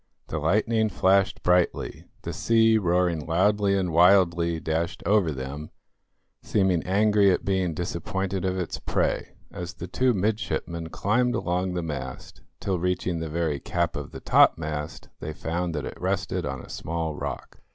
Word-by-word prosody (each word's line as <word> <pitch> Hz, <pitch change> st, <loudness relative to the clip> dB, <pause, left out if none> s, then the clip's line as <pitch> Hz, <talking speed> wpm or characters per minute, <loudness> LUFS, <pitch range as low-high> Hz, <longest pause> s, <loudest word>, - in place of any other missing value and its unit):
The 80 Hz, -, -2 dB
lightning 110 Hz, +7 st, +2 dB
flashed 95 Hz, -1 st, +2 dB
brightly, 90 Hz, 0 st, +1 dB, 0.2 s
the -, -, -4 dB
sea, 115 Hz, -1 st, +3 dB
roaring 90 Hz, -4 st, +1 dB
loudly 100 Hz, +3 st, +2 dB
and 90 Hz, -3 st, -1 dB
wildly, 85 Hz, -1 st, +4 dB
dashed 80 Hz, +1 st, -2 dB
over 100 Hz, -4 st, +3 dB
them, 70 Hz, +2 st, -6 dB, 0.7 s
seeming 95 Hz, -5 st, +1 dB
angry 105 Hz, +1 st, +4 dB
at 90 Hz, -, +1 dB
being 95 Hz, -4 st, 0 dB
disappointed 90 Hz, +3 st, -3 dB
of 95 Hz, 0 st, -1 dB
its 90 Hz, -, -3 dB
prey, -, -, -1 dB, 0.2 s
as 90 Hz, +1 st, -6 dB
the 90 Hz, -, -6 dB
two 125 Hz, +6 st, +1 dB
midshipmen 90 Hz, -5 st, -2 dB
climbed 120 Hz, +8 st, +1 dB
along 90 Hz, 0 st, -1 dB
the 90 Hz, -, -2 dB
mast, 65 Hz, -5 st, -6 dB, 0.2 s
till, 95 Hz, -3 st, -1 dB
reaching 90 Hz, -1 st, -1 dB
the 80 Hz, -1 st, -4 dB
very 80 Hz, -3 st, -1 dB
cap -, -, -1 dB
of -, -, -5 dB
the -, -, -9 dB
topmast, 75 Hz, -1 st, +2 dB
they 75 Hz, -, -5 dB
found 85 Hz, +2 st, -3 dB
that 75 Hz, -, -3 dB
it -, -, -8 dB
rested -, -, -1 dB
on 65 Hz, -2 st, -4 dB
a -, -, -13 dB
small 80 Hz, 0 st, -3 dB
rock. 75 Hz, -, -6 dB
90 Hz, 155 wpm, -26 LUFS, 80-100 Hz, 0.7 s, wildly